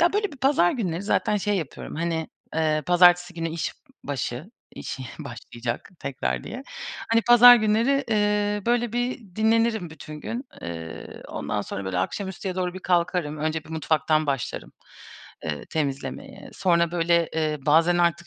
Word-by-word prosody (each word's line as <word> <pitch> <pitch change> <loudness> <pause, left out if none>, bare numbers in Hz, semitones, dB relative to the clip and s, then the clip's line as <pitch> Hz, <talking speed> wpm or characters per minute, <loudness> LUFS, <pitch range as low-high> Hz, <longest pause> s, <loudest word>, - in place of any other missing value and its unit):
ya, 345 +2 +4
böyle 415 -3 0
bir - - -10
pazar 265 -10 +3
günleri 185 -7 -2
zaten 210 +1 +1
şey 205 0 0
yapıyorum. 160 -7 -5
Hani, 165 -1 -2 0.3
eee, 155 -1 +1
pazartesi 175 0 +5
günü 165 -1 -3
işbaşı 155 - -5 0.3
iş - - -5 0.2
başlayacak 120 0 -6
tekrar 135 -1 -2
diye. 255 +4 -6 0.5
Hani, 230 0 +4
pazar 240 +1 +9
günleri, 230 +6 +2
ııı, 210 -1 +1
böyle 240 -1 +1
bir 240 -6 -3
dinlenirim 220 -4 +2
bütün 155 0 -10
gün, 240 - -4 0.2
ııı, 80 -1 -7
ondan 105 -1 -3
sonra 100 - -5
böyle 95 -1 -2
akşamüstüye 190 - -3
doğru 180 -1 -2
bir 185 - -7
kalkarım, 175 -4 0
önce 155 +1 -2
bir - - -14
mutfaktan 155 -1 +1
başlarım, 135 -5 -3 0.7
ııı, 75 -2 -3
temizlemeye. 140 -3 -4
Sonra 170 -3 +2
böyle, 170 -1 +2
eee, 155 -1 0
bazen 165 +4 +4
artık 170 -1 +1
175 Hz, 150 wpm, -25 LUFS, 155-215 Hz, 0.7 s, pazar